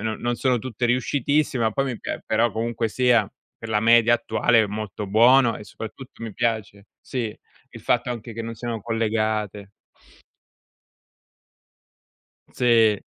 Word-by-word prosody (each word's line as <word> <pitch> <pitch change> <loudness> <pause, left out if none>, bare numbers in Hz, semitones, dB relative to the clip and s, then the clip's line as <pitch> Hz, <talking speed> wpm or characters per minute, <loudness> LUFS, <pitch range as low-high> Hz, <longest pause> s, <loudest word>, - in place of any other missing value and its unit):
non 110 0 -3
non 120 0 -1
sono 125 0 +1
tutte 120 0 -3
riuscitissime, 130 +1 0
ma 110 - +2
poi 135 +5 -1
mi 130 -4 -4
pia - - -5
però, 115 +2 +1
comunque 115 0 -2
sia, 120 -3 +2 0.3
per 115 - -9
la 105 -1 +1
media 115 +1 +5
attuale 120 0 +2
è - - 0
molto 105 0 -5
buono, 115 +3 +5
e - - -10
soprattutto 115 +4 -10
mi 110 - -6
piace 105 -2 -2
sì, 115 -5 -4 0.4
il - - -11
fatto 125 0 0
anche 115 -1 -6
che 115 +1 -5
non 115 0 -6
siano 115 0 -5
collegate. 110 -2 -2 2.8
Sì. 115 -4 +3
115 Hz, 145 wpm, -23 LUFS, 110-120 Hz, 2.8 s, media